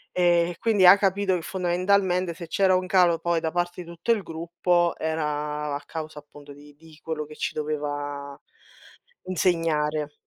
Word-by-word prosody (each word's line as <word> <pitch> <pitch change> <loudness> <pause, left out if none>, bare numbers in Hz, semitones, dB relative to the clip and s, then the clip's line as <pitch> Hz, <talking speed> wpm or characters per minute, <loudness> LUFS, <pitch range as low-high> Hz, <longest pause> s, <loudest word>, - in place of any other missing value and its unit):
Ehm, 175 -1 +3
e 170 - -11
quindi 210 -5 +3
ha 180 +2 +10
capito 200 -1 +1
che 180 - -1
fondamentalmente 180 0 0
se 170 - -8
c'era 190 +2 +3
un 185 0 0
calo 180 -3 +4
poi 170 0 0
da 160 -1 -2
parte 175 +1 -2
di 170 - -11
tutto 170 +6 -2
il 220 -3 +2
gruppo 170 +1 0
era 150 -1 -2
a 140 - -3
causa 155 -2 -6
appunto 145 0 -14
di 145 0 -16
di 160 0 -18
quello 155 -2 -4
che 150 +1 -12
ci - - -3
doveva 145 -2 -4 0.8
insegnare. 155 -5 0
165 Hz, 170 wpm, -25 LUFS, 150-180 Hz, 0.8 s, ha